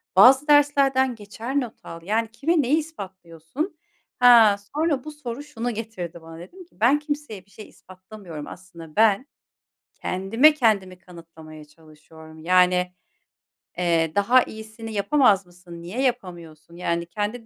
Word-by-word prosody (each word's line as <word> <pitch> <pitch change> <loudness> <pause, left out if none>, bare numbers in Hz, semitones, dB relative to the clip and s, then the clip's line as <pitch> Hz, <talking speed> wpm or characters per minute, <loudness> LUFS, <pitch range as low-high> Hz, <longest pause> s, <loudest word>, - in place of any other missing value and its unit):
Bazı 265 +9 +6
derslerden 275 -3 +3
geçer 225 +6 -4
not 240 -4 -8
al. 165 0 -9
Yani, 220 +3 -1
kime 310 +6 +1
neyi 280 +5 +1
ispatlıyorsun?" 195 - -7 0.4
Ha, 235 -4 +7 0.2
sonra 300 -4 0
bu 305 - -8
soru 285 -2 -7
şunu 245 -5 -5
getirdi 180 -7 -7
bana 165 0 -12
dedim 360 - -12
ki, - - -31
"Ben 265 +7 +4
kimseye 290 - -6
bir 200 - -28
şey 215 +3 -12
ispatlamıyorum. 185 -4 -12
Aslında 170 -4 -13
ben 220 +3 +3 0.7
kendime 225 +12 +2
kendimi 205 -9 0
kanıtlamaya 165 -4 -14
çalışıyorum. 160 +1 -17
Yani, 180 +1 +2 0.8
eee, 165 -3 +1
daha 240 +5 +4
iyisini 220 +1 -10
yapamaz 205 -3 +2
mısın? 175 -1 -14
Niye 195 +10 -5
yapamıyorsun? 170 - -4
Yani, 170 -1 -2
kendi 210 +6 -5
205 Hz, 135 wpm, -23 LUFS, 175-255 Hz, 0.8 s, Ha